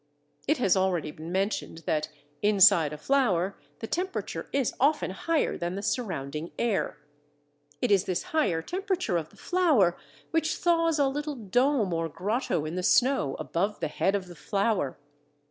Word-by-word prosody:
It 305 - +3
has 200 -7 +3
already 180 -5 0
been 160 +3 -9
mentioned 190 -3 -2
that, 155 -1 0 0.3
inside 200 -6 +5
a 150 - -6
flower, 195 - +1 0.3
the - - -3
temperature 365 +10 -3
is 275 -4 0
often 285 -5 +2
higher 320 - -1
than 175 +1 -2
the 200 - -5
surrounding 170 - -3
air. 225 -9 0 0.9
It 245 - +2
is 195 -2 +4
this 185 - -1
higher 175 - +1
temperature 375 - -2
of 160 -2 -4
the - - -21
flower 295 - +3 0.4
which 325 -1 +1
thaws 330 -2 +2
a 285 -2 +3
little 295 +2 -3
dome 240 -1 +1
or 165 0 -1
grotto 195 - -1
in 155 - -4
the 180 - -2
snow 245 - +3
above 170 +8 -2
the 160 - -2
head 195 +6 +1
of 195 -2 -2
the 180 - -11
flower. 195 - -1
200 Hz, 160 wpm, -28 LUFS, 170-275 Hz, 0.9 s, inside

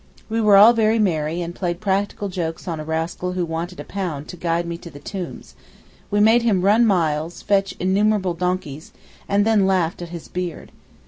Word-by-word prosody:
We 225 +1 0
were 210 -2 +6
all 215 +4 +9
very 225 -1 +2
merry, 170 -4 0
and 170 0 -6
played 175 -1 -3
practical 205 0 -1
jokes 175 -2 -4
on 165 -3 -3
a - - -4
rascal 165 +3 -3
who 180 -1 -1
wanted 170 +2 -5
a - - -5
pound 165 -7 -5
to - - -7
guide 170 0 -1
me 170 0 -4
to 170 - -10
the 145 - -12
tombs: 180 +5 -7 0.6
we 205 - +1
made 225 +3 +5
him 215 -6 +2
run 220 +4 +4
miles, 165 -4 0
fetch 195 -1 +1
innumerable 190 0 +1
donkeys, 170 -4 -3 0.4
and 200 +1 +3
then 215 -3 +3
laughed 180 -3 0
at 175 - -6
his 170 -1 -8
beard. 180 -2 -5
180 Hz, 195 wpm, -21 LUFS, 170-205 Hz, 0.6 s, all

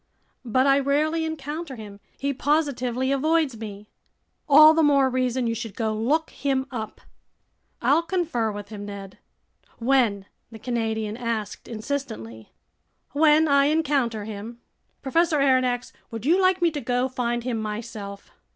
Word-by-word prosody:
"But 255 +2 +2
I 275 0 +5
rarely 305 +4 +1
encounter 305 -1 -5
him. 205 -3 -10 0.2
He 280 0 -1
positively 260 -3 0
avoids 305 -1 +1
me." 210 -1 -8 0.6
"All 305 +2 +9
the 325 - +3
more 280 -3 +4
reason 255 0 0
you 230 - 0
should 225 -2 -6
go 220 -2 -1
look 280 +9 0
him 270 -2 -1
up." 220 -4 -6 0.8
"I'll 285 +7 +4
confer 335 - -1
with 205 0 -8
him, 210 -2 -7
Ned." 200 -1 -9 0.6
"When?" 230 -6 +2 0.3
the 225 - -9
Canadian 220 -2 -2
asked 230 -4 -4
insistently. 215 - -5 0.6
"When 310 +1 +4
I 280 -1 +4
encounter 280 -8 +1
him." 220 +2 -8 0.4
"Professor 330 +3 +2
Aronnax, 255 -3 +1 0.2
would 225 0 -7
you 350 +6 +4
like 370 -1 +3
me 340 - +4
to 295 -2 -4
go 245 +1 0
find 240 -2 -2
him 240 -2 -2
myself?" 210 -2 -6
255 Hz, 140 wpm, -24 LUFS, 220-290 Hz, 0.8 s, All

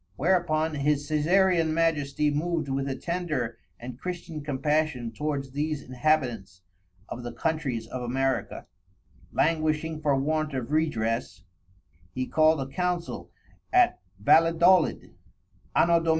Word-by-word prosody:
Whereupon 160 -1 +1
his_ 145 0 0
Caeserean 165 +1 +2
Majesty 150 -3 +1
moved 160 +1 -1
with 135 +1 -1
a 135 - -2
tender 150 -9 -3 0.2
and 125 +1 -8
Christian 175 -3 -5
compassion 145 -3 -1
towards 140 -2 -3
these 150 +1 -2
Inhabitants 125 -9 -1 0.4
of 125 - -6
the 120 0 -6
Countries 140 -6 -2
of 125 +2 -6
America, 130 +2 -2 0.7
languishing 155 0 0
for 145 -2 +2
want 155 +1 -1
of 130 +1 -4
redress, 115 -9 -1 0.7
he 130 - -1
called 155 +1 +3
a 135 - -4
Council 180 +1 -2 0.4
at 370 -1 +4 0.2
Valedolid, 165 - +4 0.6
_Anno 170 -1 +4
Dom. - - -5
150 Hz, 120 wpm, -27 LUFS, 130-160 Hz, 0.7 s, at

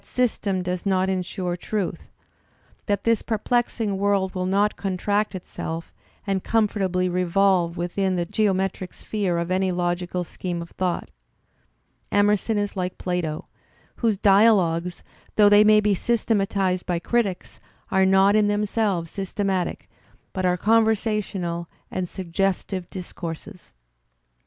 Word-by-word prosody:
ystem 205 -6 -1
does 180 0 -3
not 190 -1 +1
ensure 180 -1 -2
truth, 195 +1 -4 0.8
that 205 -2 0
this 230 -1 +2
perplexing 225 -2 -1
world 200 -2 +1
will 185 -1 -2
not 200 +2 +2
contract 205 +2 -1
itself 165 -2 -6 0.3
and 195 -2 -1
comfortably 195 -5 +1
revolve 180 -1 +2
within 185 +2 -1
the 175 -1 0
geometric 190 -2 -1
sphere 195 -5 -2
of 170 +1 -2
any 185 0 +1
logical 175 0 -1
scheme 175 +1 -5
of 170 0 -8
thought. 180 -2 -2 1.0
Emerson 205 +1 +2
is 205 0 -2
like 180 -1 -3
Plato, 175 -4 -2 0.5
whose 225 -4 +1
dialogues, 190 -4 +3 0.3
though 205 -1 +6
they 205 +1 +7
may 215 0 +6
be 210 -1 +2
systematized 195 -4 0
by 175 - 0
critics, 195 0 -1 0.3
are 190 0 +4
not 195 +2 +5
in 210 -1 +4
themselves 205 -4 0
systematic, 195 -1 -2 0.5
but 185 -2 0
are 180 0 +2
conversational 210 -5 +1 0.2
and 185 -2 -3
suggestive 185 0 -2
discourses. 180 - -8
190 Hz, 125 wpm, -24 LUFS, 180-205 Hz, 1.0 s, they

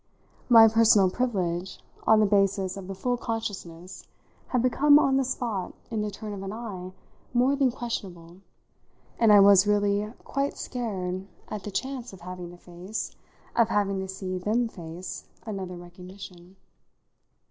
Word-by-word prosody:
My 225 -2 +9
personal 220 -4 +5
privilege, 185 -6 -2 0.3
on 220 -1 +6
the - - +5
basis 195 -2 +2
of 195 -2 -8
the 195 - -5
full 245 +6 -1
consciousness, 190 -7 -5 0.4
had 250 -2 0
become, 285 +3 +5
on 270 -2 +3
the 270 - +2
spot, 235 -7 -3 0.2
in 220 -2 -1
the 210 - -2
turn 210 +1 -7
of 195 - -6
an 195 0 -5
eye, 205 -5 -6 0.4
more 255 +3 +4
than 275 -2 +3
questionable, 185 -9 -6 0.8
and 225 -2 +5
I 205 - +9
was 200 0 +7
really 205 0 +1
quite 275 +1 -2
scared 190 -6 -4 0.2
at 215 - -5
the - - -5
chance 255 +2 -4
of 190 - -12
having 180 0 -7
to 175 - -12
face 180 +4 -6 0.4
of 230 -2 +4
having 200 -2 +1
to 190 - -4
see 185 -1 -4
them 225 +6 +1
face 175 -3 -8 0.2
another 190 -4 -5
recognition. 180 +1 -12
200 Hz, 155 wpm, -27 LUFS, 185-230 Hz, 0.8 s, My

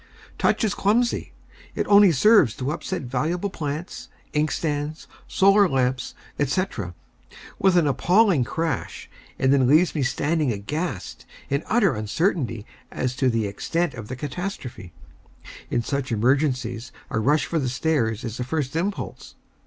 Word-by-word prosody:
Touch - - +2
is 210 -2 +1
clumsy. 230 +5 +1 0.4
It - - -1
only 200 -2 +7
serves 165 - +5
to 130 +3 -2
upset 175 +1 -4
valuable 160 +10 -2
plants, 150 +2 -5 0.3
inkstands, 150 0 -1 0.2
solar 195 0 +4
lamps, 130 -1 -1 0.3
&c., 145 +7 +1 1.0
with 190 -2 +4
an 170 - +4
appalling 175 - +3
crash, 160 +6 -3 0.3
and 130 +1 +3
then 135 -3 +4
leaves 155 +6 +4
me 150 - -1
standing 145 +2 0
aghast, 110 - -4 0.2
in 140 +1 +1
utter 240 +2 +3
uncertainty 115 - -1 0.2
as 125 0 -3
to 130 -1 +2
the 115 -2 0
extent 165 +12 -2
of 110 -3 -8
the 130 - -5
catastrophe. 140 - -6 0.8
In 120 - 0
such 140 +1 -3
emergencies 125 0 0 0.2
a - - 0
rush 145 +7 +2
for 165 - -1
the 130 -4 -1
stairs 125 -4 0
is 115 -1 -5
the 125 - -2
first 140 +1 -3
impulse. 195 +5 -4
145 Hz, 140 wpm, -24 LUFS, 125-175 Hz, 1.0 s, only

